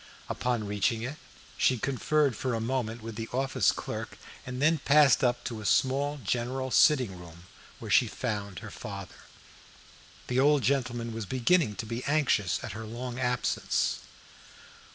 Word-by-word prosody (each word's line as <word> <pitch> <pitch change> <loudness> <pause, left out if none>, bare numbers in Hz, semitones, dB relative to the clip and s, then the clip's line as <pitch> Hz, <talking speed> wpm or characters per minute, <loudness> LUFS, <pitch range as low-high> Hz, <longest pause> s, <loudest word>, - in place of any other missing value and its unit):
Upon 120 -3 -1
reaching 110 +3 0
it 135 +5 -5 0.4
she 130 - +3
conferred 140 +2 +1
for 130 +1 -2
a - - -1
moment 115 -1 -2
with 115 -1 -7
the 115 0 -5
office 130 -5 +2
clerk, - - -6 0.3
and 125 0 -5
then 155 +3 +3
passed 145 0 +5
up 120 -1 +1
to 115 -3 -5
a - - -8
small 140 +2 +1
general 125 +5 -2
sitting 125 - +4
room 85 -1 -12 0.3
where - - -7
she - - +5
found 100 -3 -4
her - - -8
father. 100 -3 -9 1.0
The 125 +1 0
old 145 0 +4
gentleman 120 -2 0
was 110 -3 -5
beginning 130 - +2
to 115 - -5
be 115 +3 -4
anxious 140 - +1
at - - -5
her 110 +1 -7
long 120 +3 -6
absence. 125 -1 0
125 Hz, 155 wpm, -29 LUFS, 110-135 Hz, 1.0 s, passed